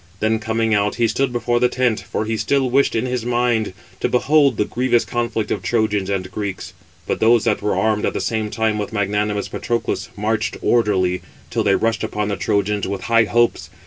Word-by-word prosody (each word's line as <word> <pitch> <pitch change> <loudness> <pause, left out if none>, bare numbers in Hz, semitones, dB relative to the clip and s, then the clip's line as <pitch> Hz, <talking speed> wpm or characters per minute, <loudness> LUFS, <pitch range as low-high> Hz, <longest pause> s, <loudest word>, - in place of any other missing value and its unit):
Then 110 +1 +1
coming 110 0 0
out, 105 0 +1
he 115 0 +2
stood 130 +4 0
before 120 0 0
the 125 0 +3
tent, 125 -4 +1
for 110 - -4
he 110 +1 -1
still 135 +2 0
wished 140 +2 +3
in 115 +2 0
his 125 -2 -2
mind 120 -3 +1 0.3
to - - 0
behold 140 0 +3
the 105 - +1
grievous 120 0 +1
conflict 120 -2 -2
of - - -1
Trojans 105 -4 0
and 95 -2 -2
Greeks. 100 -1 -5 0.3
But - - -2
those 115 -1 +4
that 110 -2 +1
were 105 0 0
armed 110 -1 +1
at - - -2
the - - -2
same 110 -2 -1
time 110 -1 0
with 105 - -4
magnanimous 105 0 -1
Patroclus, 120 0 -2
marched 110 +2 -1
orderly, 95 -6 +2 0.3
till - - 0
they 100 - +3
rushed 115 -1 0
upon 105 0 -2
the 100 - -1
Trojans, 105 -1 0
with 100 0 -4
high 115 -1 +3
hopes. 120 +2 +1
110 Hz, 205 wpm, -20 LUFS, 105-120 Hz, 0.3 s, those